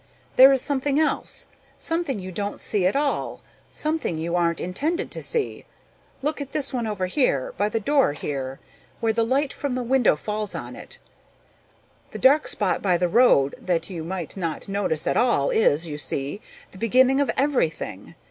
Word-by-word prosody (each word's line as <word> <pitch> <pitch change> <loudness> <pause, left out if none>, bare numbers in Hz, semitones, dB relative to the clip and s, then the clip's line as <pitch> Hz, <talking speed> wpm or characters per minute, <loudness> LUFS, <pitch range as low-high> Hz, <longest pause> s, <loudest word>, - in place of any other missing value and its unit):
There 265 +2 +9
is 265 -2 +2
something 285 +1 0
else, 315 - 0 0.3
something 325 -8 -2
you 185 0 -7
don't 205 +2 -4
see 195 -4 +1
at 190 - 0
all, 285 0 -1 0.3
something 305 - -2
you 170 +2 -2
aren't 170 -1 +1
intended 295 - -2
to - - -4
see. 460 -3 0 0.6
Look 300 0 -1
at 275 - -7
this 275 -2 -1
one 240 -3 -1
over 205 -4 -2
here, 180 - 0
by 205 +2 0
the 225 - -1
door 275 - +2
here, 135 -2 -5 0.4
where 225 -1 +1
the 230 +1 +1
light 270 +5 0
from 280 -3 -3
the 255 - -2
window 245 -6 +3
falls 210 +6 -3
on - - -6
it. - - -10 1.1
The - - -7
dark 285 +3 +4
spot 200 -4 0
by 180 -3 +2
the 180 - +1
road 185 - +4
that 175 0 -2
you 165 -3 -5
might 175 -2 -5
not 170 -5 -4
notice 195 -6 -1
at - - +1
all 235 - +2
is, 165 -6 +2
you 150 -1 -5
see, 145 +7 -2 0.3
the 190 - -13
beginning 255 +5 +4
of 285 - 0
everything. 165 - -1
210 Hz, 180 wpm, -24 LUFS, 170-270 Hz, 1.1 s, There